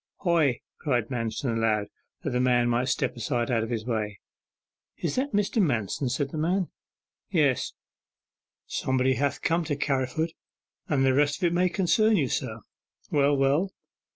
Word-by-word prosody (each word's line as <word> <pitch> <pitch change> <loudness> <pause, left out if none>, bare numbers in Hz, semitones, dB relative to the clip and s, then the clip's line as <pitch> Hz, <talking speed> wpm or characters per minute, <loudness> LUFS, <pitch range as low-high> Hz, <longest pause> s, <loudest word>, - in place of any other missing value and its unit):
'Hoy!' 165 -9 +2 0.2
cried 120 -6 0
Manston, 115 0 -2
aloud, 110 -2 +1 0.4
that - - -2
the 125 - 0
man 125 -1 +3
might 120 +2 +1
step - - 0
aside 120 0 -1
out 115 -2 +2
of 110 - -3
the 115 -3 -2
way. 105 -4 -2 0.8
'Is - - -2
that 270 +3 0
Mr. 205 +2 +1
Manston?' 125 - 0
said 135 +2 -1
the 155 - -4
man. 180 +3 +1 0.6
'Yes.' 150 - +2 0.9
'Somebody 130 0 +1
ha' 140 0 0
come 170 +1 +2
to 150 -2 -1
Carriford: 140 +3 -1 0.6
and 135 -3 +2
the 130 - +4
rest 145 +1 +2
of - - -9
it 175 -1 +3
may 180 +1 +3
concern 210 +4 +3
you, 140 -7 +1
sir.' - - -3 0.5
'Well, 145 0 +3
well. 145 +8 +2
135 Hz, 160 wpm, -27 LUFS, 120-165 Hz, 0.9 s, the